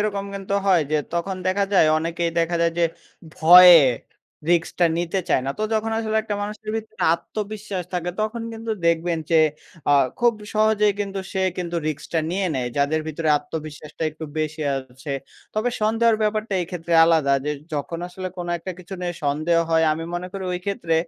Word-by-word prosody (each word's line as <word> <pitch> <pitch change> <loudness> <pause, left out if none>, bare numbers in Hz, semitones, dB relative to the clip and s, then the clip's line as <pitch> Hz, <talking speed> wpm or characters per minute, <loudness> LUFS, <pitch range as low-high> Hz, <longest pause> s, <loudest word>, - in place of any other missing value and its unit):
এরকম 200 -1 -1
কিন্তু 195 0 -3
হয় 180 -4 +4
যে - - +4 0.2
তখন 185 +2 -2
দেখা 200 +2 +2
যায় 180 -5 +5
অনেকেই 170 +1 -2
দেখা 170 +1 +1
যায় 170 - +2
যে 170 - +4 0.5
ভয়ে 175 0 +9 0.7
রিস্ক-টা 170 +1 +2
নিতে 175 +2 -1
চায় 130 - +2
না। - - 0
তো - - -2
যখন 220 +1 0
আসলে 220 -1 -1
একটা 210 -1 -3
মানুষের 215 +1 -5
ভিতরে 220 -1 -8
আত্মবিশ্বাস 210 -1 -5
থাকে 175 0 -1
তখন 225 +2 -2
কিন্তু 225 0 -6 0.2
দেখবেন 170 0 +1
যে 160 -1 +5 0.5
আ - - +6 0.3
খুব 240 -1 +4 0.2
সহজেই 215 -1 +3
কিন্তু 195 -1 -3
সে 190 -1 0 0.2
কিন্তু 175 -1 -3
রিস্ক-টা 155 +2 -3
নিয়ে 190 +1 0
নেয়, 125 -2 -1
যাদের 145 +2 +1
ভিতরে 155 +1 -2
আত্মবিশ্বাসটা 150 +1 -8
একটু 160 +1 -8
বেশি 155 0 -2
আছে। 135 +2 -7 0.4
তবে 220 +3 0
সন্দেহের 225 +1 +3
ব্যাপারটা 215 -1 -1
এক্ষেত্রে 170 -1 -5
আলাদা 160 -4 +3
যে 150 - -1 0.2
যখন 150 +4 -3
আসলে 185 +1 -6
কোনো 175 -1 -4
১ 165 - -13
টা 185 - -2
কিছু 185 +2 -8
নিয়ে 175 -1 -3
সন্দেহ 155 +4 +1
হয় 160 0 +4
আমি 165 +1 -4
মনে 175 +1 -3
করি 195 -1 -5
ওই 180 - -3
ক্ষেত্রে 170 -5 -1
175 Hz, 180 wpm, -23 LUFS, 160-205 Hz, 0.7 s, ভয়ে